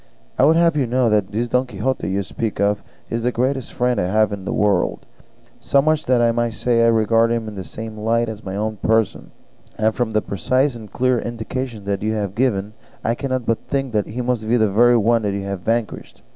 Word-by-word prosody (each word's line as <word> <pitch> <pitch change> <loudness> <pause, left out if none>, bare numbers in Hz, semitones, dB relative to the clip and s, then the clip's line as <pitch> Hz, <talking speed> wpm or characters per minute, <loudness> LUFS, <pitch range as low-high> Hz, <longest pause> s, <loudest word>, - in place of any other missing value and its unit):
I 130 - +6
would 160 +3 +5
have 170 -1 +3
you 140 -4 +1
know 125 -1 +2
that 105 -2 +1
this 115 +3 -1
Don 125 +2 +1
Quixote 125 +3 -2
you 100 +1 -1
speak 110 +1 -4
of 100 +1 +1 0.3
is 115 - -1
the 125 +2 +1
greatest 130 +1 -1
friend 125 0 0
I - - 0
have 110 +3 +2
in 100 -2 -6
the - - -2
world; 105 -4 +1 0.5
so 140 - +2
much 155 +2 +1
so - - -2
that 120 -2 +4
I - - +3
may 120 0 0
say 115 +1 +1
I - - +5
regard 115 0 +3
him 115 -1 -1
in 110 - -6
the 95 -2 -6
same 110 +2 -8
light 115 +2 +1
as 110 -1 -7
my 95 0 -5
own 110 +1 -2
person; 110 +1 0 0.5
and 110 0 +2
from 120 -1 -1
the 110 - +2
precise 130 +8 0
and 110 -4 -10
clear 125 -1 +1
indications 120 -2 -5
you 110 +1 0
have 100 -3 -2
given 105 -3 0 0.3
I 115 - +1
cannot 130 -1 -3
but 115 -1 -1
think 135 -3 -2
that 105 -2 0
he 125 +3 -4
must 120 -3 -1
be 120 - +4
the 110 -3 +2
very 120 +4 +5
one 115 +1 +2
you 100 -1 -2
have 100 -1 -4
vanquished. 115 +4 -3
115 Hz, 230 wpm, -20 LUFS, 105-125 Hz, 0.5 s, I